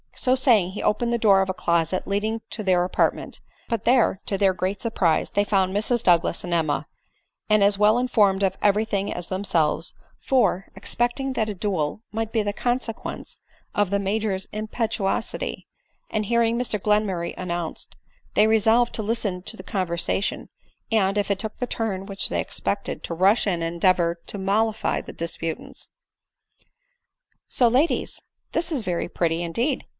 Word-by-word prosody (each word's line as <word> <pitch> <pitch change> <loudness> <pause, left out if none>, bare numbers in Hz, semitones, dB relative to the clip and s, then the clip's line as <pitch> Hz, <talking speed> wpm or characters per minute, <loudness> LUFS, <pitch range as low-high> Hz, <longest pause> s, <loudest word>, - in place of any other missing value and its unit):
So 255 0 +2
saying, 230 -9 +3
he 200 - -5
opened 235 +3 +1
the - - +2
door 200 -4 +5
of 190 - -1
a - - 0
closet 170 0 0
leading 215 +3 -1
to 220 - -5
their 180 -2 +3
apartment; 180 - 0 0.3
but 230 -3 -2
there, 240 -5 +3
to 195 - 0
their 195 -1 +3
great 185 +2 -2
surprise, 185 -8 +1
they 205 - +2
found 195 -2 +1
Mrs 235 +3 +1
Douglas 170 -1 +3
and 175 - -3
Emma, 160 -3 0 0.6
and 215 -1 +5
as 200 0 +4
well 210 +2 +5
informed 205 -6 +2
of 190 -1 +1
every 210 +1 +3
thing 200 -2 -1
as 175 -1 -5
themselves; 175 -4 0 0.3
for, 245 -8 +1
expecting 250 +3 -1
that 220 -3 -1
a 210 - -4
duel 185 -3 -2
might 225 0 -3
be 225 -2 +1
the 205 0 -2
consequence 240 0 -3 0.3
of 205 -2 +1
the 200 - +1
Major's 200 -1 -1
impetuosity, 215 -1 -2 0.4
and 215 -1 -1
hearing 235 +1 +2
Mr 240 -4 -1
Glenmurray 200 -4 0
an 185 - -5
nounced, 170 -1 -4 0.5
they 210 - +6
resolved 225 +2 +3
to 220 - -3
listen 210 -4 -1
to 225 - -8
the - - -9
conversation, 185 0 -1 0.4
and, 200 -2 +2
if 205 0 0
it 195 - 0
took 215 +1 -4
the 250 - -2
turn 205 -5 -3
which 195 -1 -2
they - - 0
expected, - - -3
to 170 - -4
rush 195 +6 +3
in 175 -4 0
and 165 +1 -2
endeavor 170 -1 +2
to - - -6
mollify 215 +3 0
the - - -10
disputants. 165 -1 -3 0.8
" - - -50
So, 245 - +4
ladies! 265 +8 +1 0.3
this 335 +1 0
is 275 -7 -1
very 175 -3 -2
pretty, 165 -1 0
indeed 235 - -1
205 Hz, 170 wpm, -24 LUFS, 185-225 Hz, 0.8 s, they